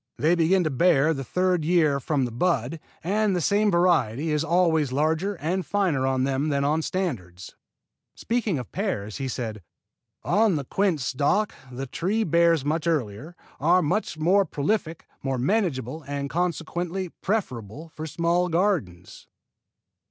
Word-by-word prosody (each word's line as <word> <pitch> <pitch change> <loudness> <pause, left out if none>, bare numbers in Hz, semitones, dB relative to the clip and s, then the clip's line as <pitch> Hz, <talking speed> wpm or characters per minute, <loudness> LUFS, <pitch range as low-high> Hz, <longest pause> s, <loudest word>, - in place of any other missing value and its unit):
They 160 +4 +3
begin 175 +2 +3
to 155 - -1
bear 160 +1 +3
the 135 -2 -4
third 180 +5 0
year 155 -4 +3
from 140 -1 0
the 120 - -5
bud, 135 +2 0 0.2
and 205 +2 +1
the - - +1
same 205 +5 +2
variety 165 - +2
is 150 0 +1
always 160 -4 +2
larger 160 +8 0
and 175 +4 -2
finer 175 -11 0
on 130 -1 +1
them 135 +3 0
than 140 -1 0
on 155 +3 +1
standards." 100 - -4 0.6
Speaking 225 -7 -1
of 125 -4 -7
pears, 110 - -3
he 135 -1 -3
said: 115 -5 -4 0.6
"On 215 -3 +3
the 145 - -2
quince 180 -3 0
stock 150 +12 +1 0.2
the 130 +2 -5
trees 200 - -1
bear 170 0 +4
much 155 +2 -1
earlier, 150 0 -2 0.2
are 175 +5 +4 0.3
more 180 +6 +3
prolific, 160 0 -2 0.2
more 135 -1 -2
manageable, 155 - -1
and 140 0 -4
consequently 175 +1 -2
preferable 155 - -3
for 155 0 -7
small 170 +3 +1
gardens." 165 - -1
160 Hz, 145 wpm, -25 LUFS, 135-180 Hz, 0.6 s, bear